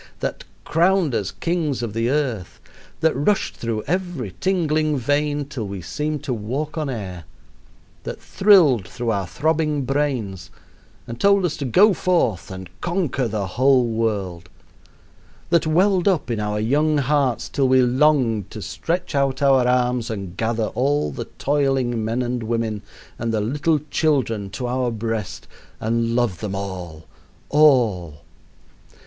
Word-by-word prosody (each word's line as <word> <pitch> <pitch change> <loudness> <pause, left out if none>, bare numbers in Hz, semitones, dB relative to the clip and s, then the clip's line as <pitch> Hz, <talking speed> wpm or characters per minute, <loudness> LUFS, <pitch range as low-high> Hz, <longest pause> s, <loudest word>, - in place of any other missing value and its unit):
that - - -3 0.2
crowned 170 -2 +2
us 100 -4 -1
kings 160 -7 -2
of 110 -3 -4
the 115 +2 0
earth; 130 -10 -2 0.4
that 160 -1 +3
rushed 170 +10 0
through 115 -2 -3
every 175 - -3
tingling 155 -5 +1
vein 145 +3 0
till 130 -6 -5
we 100 -1 -5
seemed 150 - -3
to 130 - -2
walk 130 +8 -3
on 155 -3 -2
air; 95 -8 -6 0.8
that - - -6
thrilled 165 - +4
through 120 -2 -3
our 100 -3 -1
throbbing 150 - 0
brains 120 -10 -2 0.6
and 115 0 -8
told 200 -1 +4
us 160 - -1
to 145 - -4
go 195 - +5
forth 165 - 0
and 95 -1 -7
conquer 170 -8 -1
the 105 -2 -2
whole 130 +6 +3
world; 100 -7 -2 1.0
that 170 -2 +3
welled 185 +3 +3
up 170 -10 +1
in 115 - -1
our 105 0 -1
young 150 +7 +2
hearts 140 -3 +1
till 135 -2 +1
we 130 0 +5
longed 125 - +2
to 110 - -8
stretch 170 - -3
out 135 -2 +1
our 135 -3 +4
arms 125 -1 +1
and 100 -5 -5
gather 115 -1 -1
all 140 - +1
the - - -5
toiling 135 -5 +1
men 115 +3 -1
and 125 0 -2
women 110 -2 -2 0.4
and 115 0 -1
the 110 - 0
little 145 +8 +1
children 125 - +1
to 125 +6 -5
our 125 0 0
breast 110 -3 -4 0.3
and 115 +1 0
love 120 -8 0
them 100 -3 -4
all 90 -5 -6 0.4
all. 115 - +3
125 Hz, 150 wpm, -22 LUFS, 110-150 Hz, 1.0 s, go